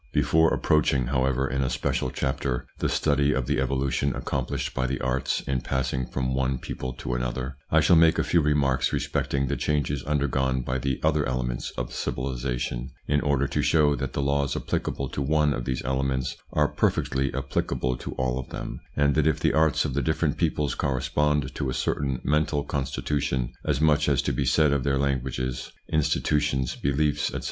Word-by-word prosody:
Before 80 0 +3
approaching, 70 -4 +2
however, 65 +1 +1
in 65 +2 -1
a 65 - +1
special 65 - -1
chapter, 65 -1 -2
the - - 0
study 70 -1 +2
of 65 - -1
the 70 0 0
evolution 70 0 0
accomplished 65 0 -2
by 65 -1 0
the 65 +2 -2
arts 65 +1 0
in 65 -2 -2
passing 65 0 -1
from 65 -1 -2
one 65 0 0
people 65 +1 -5
to 60 - -4
another, 60 +2 -3
I - - +4
shall - - +5
make 80 0 +5
a - - +2
few 85 - +3
remarks 70 -3 +2
respecting 70 0 -1
the 70 +2 -1
changes 70 -2 0
undergone 65 -2 0
by 65 +2 -2
the 65 0 -1
other 75 -1 +3
elements - - -2
of - - -4
civilisation, 60 -1 -3 0.2
in 75 0 +2
order 70 -1 +1
to - - 0
show 75 -3 +3
that 65 -1 -4
the 70 - -1
laws 70 0 +1
applicable 70 - -2
to 70 - -4
one 75 +1 +2
of - - -4
these 65 -1 -2
elements 65 0 -1 0.2
are 75 -1 +3
perfectly 65 -1 0
applicable 65 -2 -1
to - - -6
all 65 0 -1
of 65 - -7
them, - - -6 0.2
and 70 -1 +3
that 75 +2 +2
if 80 - +2
the - - +2
arts 80 -1 +3
of - - -2
the 70 - +1
different 80 +1 0
peoples 75 -3 0
correspond 70 +1 0
to 65 - -2
a 65 - -2
certain 70 -3 -1
mental 75 0 +1
constitution, 65 -2 -2
as - - +1
much 75 -1 +3
is 70 -1 +2
to 70 - 0
be - - 0
said 75 -3 +4
of 70 -3 0
their 70 0 +1
languages, 65 -2 -2 0.2
institutions, 75 -3 +1
beliefs, 70 +2 0
etc. - - -3
70 Hz, 190 wpm, -26 LUFS, 65-75 Hz, 0.2 s, shall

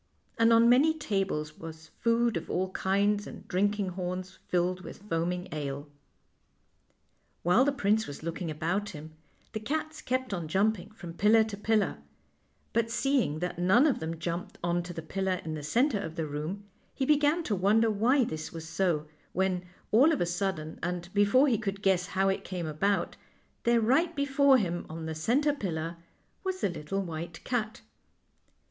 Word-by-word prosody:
And 230 0 +5
on 230 0 +6
many 280 +7 +5
tables 195 - -2
was 160 -1 -9
food 230 -1 +2
of 165 - -4
all 185 +1 -1
kinds, 200 +2 +1
and - - -10
drinking 205 +1 +1
horns 185 0 -5
filled 180 +1 0
with 195 - -10
foaming 175 0 -1
ale. 140 -2 -3
11 145 - -22 1.5
While 180 +10 +5
the 285 - +3
prince 220 -4 +1
was 145 - -8
looking 170 +1 -3
about 175 +7 -1
him 155 +2 -10 0.4
the 215 - -2
cats 310 +7 -3
kept 255 -2 -1
on 170 -4 -3
jumping 200 +4 +1
from 175 -6 -9
pillar 215 +5 +5
to 220 -2 -5
pillar; 210 0 +1 0.7
but 230 0 +1
seeing 245 - +1
that 180 -1 -3
none 190 +10 +5
of 290 - +2
them 160 +1 -4
jumped 175 +4 -4
on 175 0 +1
to 175 +1 -7
the 165 -2 -6
pillar 190 +2 -1
in 160 - -3
the 155 - -4
centre 235 - +2
of 165 -5 -5
the 165 - -2
room, 155 +7 -4 0.3
he 270 - 0
began 300 +3 +3
to 215 - 0
wonder 215 +4 +3
why 245 +6 +3
this 155 -8 -4
was 165 -1 -7
so, 165 -3 0 0.3
when, 185 0 0 0.3
all 265 +9 +6
of 305 - 0
a - - +2
sudden, 175 -3 -3
and 175 +1 -4
be 205 0 +5
fore 255 +8 +5
he 235 -6 +2
could 200 -2 -4
guess 185 -2 +2
how 195 0 +1
it 195 - 0
came 180 -3 -4
about, 175 +4 0 0.5
there 235 0 +4
right 280 +10 +2
before 280 -1 +4
him 175 -6 -1
on 160 0 -6
the 160 - -3
center 255 - +2
pillar 170 - -3 0.5
was 375 -1 -3
the - - +2
lit 150 -4 -8
tle 195 +2 -1
white 165 -1 -6
cat. 235 -1 -2
195 Hz, 180 wpm, -29 LUFS, 170-230 Hz, 1.5 s, on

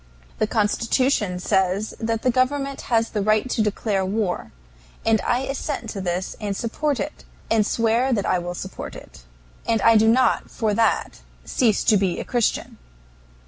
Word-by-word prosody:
The 215 - +2
Constitution 220 -1 +1
says 190 +2 0
the 225 0 0
government 275 +2 0
has 230 -2 +2
the 210 - -1
right 215 +4 +2
to 225 - +1
declare 210 -1 0
war, 195 -1 -2 0.5
and 225 -1 +3
I 245 +1 0
assent 270 -3 -4
to 200 - -5
this 180 0 -2
and 200 -2 -2
support 275 +4 -1
it, 300 - -5 0.3
and 225 -1 +4
swear 230 +4 +1
that 210 -5 0
I 185 - +2
will 175 0 -5
support 190 +2 -7
it. - - -13 0.4
And 230 -1 +2
I 230 -1 +6
do 220 +1 +4
not 255 +3 +3
for 220 -3 -1
that 225 0 +1 0.3
cease 220 - +2
to 215 - +4
be 190 -3 0
a - - -3
Christian. 240 -3 -1
220 Hz, 165 wpm, -23 LUFS, 200-240 Hz, 0.5 s, I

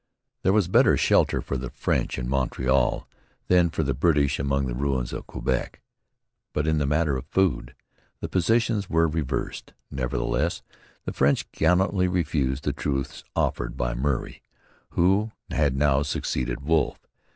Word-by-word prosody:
There 95 - +3
was 100 -3 +3
better 90 - +4
shelter - - +3
for 70 - -3
the 65 0 -5
French - - -1
in 60 -2 -3
Montreal 65 0 +1 0.4
than 90 -2 +5
for 80 - -1
the 70 -1 0
British 70 0 +2
among 70 0 0
the 60 - -3
ruins 65 -1 -1
of - - -6
Quebec. - - -2 0.7
But 75 - 0
in 80 -1 +2
the 70 - 0
matter 75 -1 +1
of 65 +1 -8
food 65 -10 0 0.4
the - - -4
positions 110 +2 +1
were 80 0 +3
reversed. 75 -3 -3 0.2
Nevertheless 70 +4 -1 0.4
the - - -3
French 70 +1 +1
gallantly 90 +3 +2
refused 75 -6 -1
the - - -1
truce 70 -2 -3
offered - - -1
them - - -13
by 60 0 -1
Murray, 65 +1 -2 0.5
who 100 +5 +2 0.2
had 75 -4 +1
now 70 0 +3
succeeded 65 -3 -2
Wolfe. 80 -3 0
70 Hz, 150 wpm, -25 LUFS, 65-85 Hz, 0.7 s, than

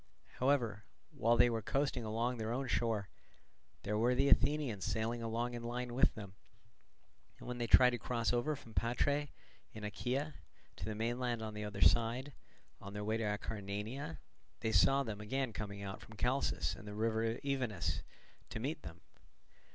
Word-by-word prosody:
However, 120 -6 +2 0.3
while 120 +1 +3
they 120 - +7
were 115 -2 0
coasting 135 +2 0
along 115 +3 -1
their 110 0 -2
own 130 +2 -1
shore, 110 -5 0 0.7
there 105 +1 0
were 120 +3 +3
the 135 +2 +3
Athenians 140 -10 +3
sailing 110 +3 -1
along 115 +2 -1
in 120 - -4
line 120 +1 -3
with 130 - +3
them; 100 -3 -8 1.0
and - - -11
when 125 0 -4
they 120 - 0
tried 125 +2 +8
to 120 - -2
cross 120 +1 0
over 145 +6 +1
from 115 -5 -13
Patrae 140 +6 +1 0.4
in 110 - -8
Achaea 130 +8 -2 0.4
to - - -5
the 110 - -3
mainland 120 +1 -1
on 110 -1 -4
the 105 0 -4
other 100 -1 -5
side, 120 +4 +4 0.5
on 100 0 -8
their 105 0 -4
way 110 +2 +1
to 115 - -2
Acarnania, 105 - -3 0.4
they 110 - +1
saw 135 +8 +5
them 110 -4 -5
again 130 +3 -1
coming 100 -1 -5
out 95 +1 -5
from 110 - -13
Chalcis 125 +5 +1
and 105 - -11
the 105 - -6
river 115 +1 +1
Evenus 115 - -1 0.5
to - - -4
meet 145 +6 -2
them. 85 0 -10
115 Hz, 175 wpm, -36 LUFS, 105-125 Hz, 1.0 s, tried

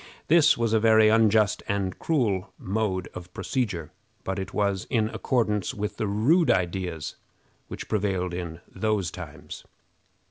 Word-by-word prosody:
This 155 -1 +6
was 115 -1 0
a 110 - +4
very 110 -1 +5
unjust 110 -2 +3
and 100 -2 -2
cruel 110 - 0
mode 95 -2 -2
of 90 0 -9
procedure, 105 - -2 0.3
but 95 +1 -3
it 95 - -5
was 100 -2 0
in 110 -4 +1
accordance 105 -7 0
with 105 0 -4
the 110 - -1
rude 130 - +3
ideas 90 -3 -1 0.5
which - - -7
prevailed 95 -4 -1
in 85 -2 -5
those 100 -3 -1
times. - - -9
105 Hz, 140 wpm, -26 LUFS, 95-110 Hz, 0.5 s, This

